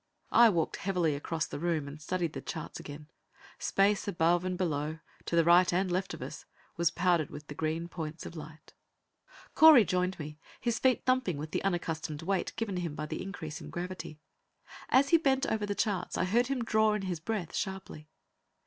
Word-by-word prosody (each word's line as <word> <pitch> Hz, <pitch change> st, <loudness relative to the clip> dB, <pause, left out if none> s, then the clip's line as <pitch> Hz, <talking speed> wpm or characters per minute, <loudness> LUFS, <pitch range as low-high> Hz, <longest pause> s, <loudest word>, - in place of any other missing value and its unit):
I 235 Hz, -1 st, +7 dB
walked 170 Hz, -6 st, 0 dB
heavily 180 Hz, -5 st, 0 dB
across 160 Hz, +3 st, -2 dB
the -, -, -6 dB
room 160 Hz, -3 st, -1 dB
and 145 Hz, +2 st, -9 dB
studied 170 Hz, 0 st, -2 dB
the -, -, -5 dB
charts 160 Hz, -4 st, -6 dB
again. 145 Hz, +1 st, -9 dB, 0.5 s
Space 200 Hz, +1 st, +2 dB
above 175 Hz, -1 st, +2 dB
and 185 Hz, 0 st, -2 dB
below, 155 Hz, -3 st, -1 dB, 0.3 s
to -, -, -2 dB
the 165 Hz, -, +5 dB
right 175 Hz, +2 st, +6 dB
and 185 Hz, +1 st, +1 dB
the -, -, 0 dB
left 185 Hz, +1 st, -1 dB
of -, -, -8 dB
us, -, -, -8 dB, 0.3 s
was 170 Hz, -1 st, +2 dB
powdered 175 Hz, -3 st, +1 dB
with 150 Hz, +1 st, -9 dB
the 145 Hz, -, -8 dB
green 160 Hz, +3 st, -2 dB
points 165 Hz, -2 st, -6 dB
of -, -, -8 dB
light. 155 Hz, 0 st, -11 dB, 0.8 s
Correy 305 Hz, -8 st, +8 dB
joined 180 Hz, 0 st, 0 dB
me, 150 Hz, 0 st, -8 dB, 0.2 s
his 235 Hz, -2 st, -1 dB
feet 260 Hz, -1 st, +2 dB
thumping 255 Hz, -, +1 dB
with 155 Hz, +2 st, -6 dB
the -, -, -2 dB
unaccustomed 165 Hz, -4 st, -2 dB
weight 195 Hz, +2 st, 0 dB
given 225 Hz, -5 st, -2 dB
him 170 Hz, -4 st, -3 dB
by 150 Hz, -, -4 dB
the -, -, -5 dB
increase 160 Hz, -6 st, -6 dB
in -, -, -9 dB
gravity. 175 Hz, -3 st, -6 dB, 0.7 s
As 275 Hz, +2 st, +4 dB
he 335 Hz, -, +7 dB
bent 270 Hz, -3 st, +2 dB
over 215 Hz, -2 st, -1 dB
the 205 Hz, -, -2 dB
charts, 200 Hz, -5 st, -1 dB
I -, -, +1 dB
heard 235 Hz, +6 st, +2 dB
him 265 Hz, -3 st, -1 dB
draw 220 Hz, -1 st, +3 dB
in 210 Hz, -, -3 dB
his 180 Hz, -3 st, -3 dB
breath 190 Hz, 0 st, -3 dB
sharply. 190 Hz, -6 st, -5 dB
175 Hz, 200 wpm, -30 LUFS, 155-200 Hz, 0.8 s, Correy